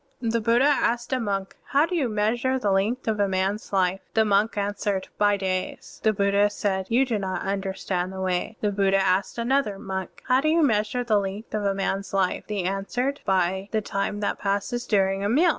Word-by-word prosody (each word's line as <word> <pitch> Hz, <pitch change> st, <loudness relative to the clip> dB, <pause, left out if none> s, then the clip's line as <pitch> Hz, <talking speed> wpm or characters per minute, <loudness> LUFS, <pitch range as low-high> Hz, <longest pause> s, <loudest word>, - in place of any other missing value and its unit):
(38) 230 Hz, -2 st, -1 dB
The 230 Hz, 0 st, +1 dB
Buddha 235 Hz, +4 st, +3 dB
asked 240 Hz, -4 st, +1 dB
a 260 Hz, -, +1 dB
monk, 195 Hz, -4 st, -3 dB
"How 285 Hz, +2 st, +3 dB
do 360 Hz, -, -3 dB
you 280 Hz, -8 st, +1 dB
measure 230 Hz, +5 st, +1 dB
the 210 Hz, -6 st, 0 dB
length 215 Hz, +7 st, 0 dB
of 215 Hz, -1 st, 0 dB
a 200 Hz, -, +3 dB
man's 190 Hz, +2 st, -1 dB
life?" 190 Hz, -1 st, +1 dB, 0.2 s
The 220 Hz, -1 st, +4 dB
monk 210 Hz, +2 st, +2 dB
answered, 200 Hz, -1 st, -2 dB
"By 205 Hz, -1 st, +4 dB
days." 185 Hz, -1 st, -4 dB
The 220 Hz, -, +3 dB
Buddha 200 Hz, 0 st, +2 dB
said, 190 Hz, -2 st, -2 dB
"You 245 Hz, +4 st, +3 dB
do 230 Hz, -5 st, -1 dB
not 190 Hz, -1 st, -3 dB
tmderstand 190 Hz, -2 st, -2 dB
the 190 Hz, 0 st, -7 dB
Way." 185 Hz, +3 st, -2 dB
The 210 Hz, -, +1 dB
Buddha 195 Hz, -1 st, +2 dB
asked 190 Hz, +3 st, +1 dB
another 235 Hz, -3 st, +1 dB
monk, 190 Hz, -1 st, -6 dB
"How 255 Hz, +1 st, +4 dB
do 310 Hz, -, +1 dB
you 325 Hz, +1 st, +3 dB
measure 220 Hz, -1 st, +1 dB
the 220 Hz, -4 st, +3 dB
length 200 Hz, +3 st, -5 dB
of 210 Hz, -1 st, -1 dB
a 195 Hz, -1 st, +1 dB
man's 195 Hz, 0 st, -2 dB
life?" 190 Hz, -2 st, 0 dB
The 205 Hz, -3 st, -2 dB
monk -, -, 0 dB
answered, 250 Hz, +8 st, -2 dB
" -, -, -43 dB
By 190 Hz, +1 st, +1 dB
the 220 Hz, -, +1 dB
time 205 Hz, 0 st, -2 dB
that 205 Hz, -, -1 dB
passes 200 Hz, +4 st, -2 dB
during 195 Hz, -1 st, +2 dB
a 200 Hz, -, +1 dB
meal." 315 Hz, +10 st, +4 dB
205 Hz, 220 wpm, -25 LUFS, 195-230 Hz, 0.2 s, The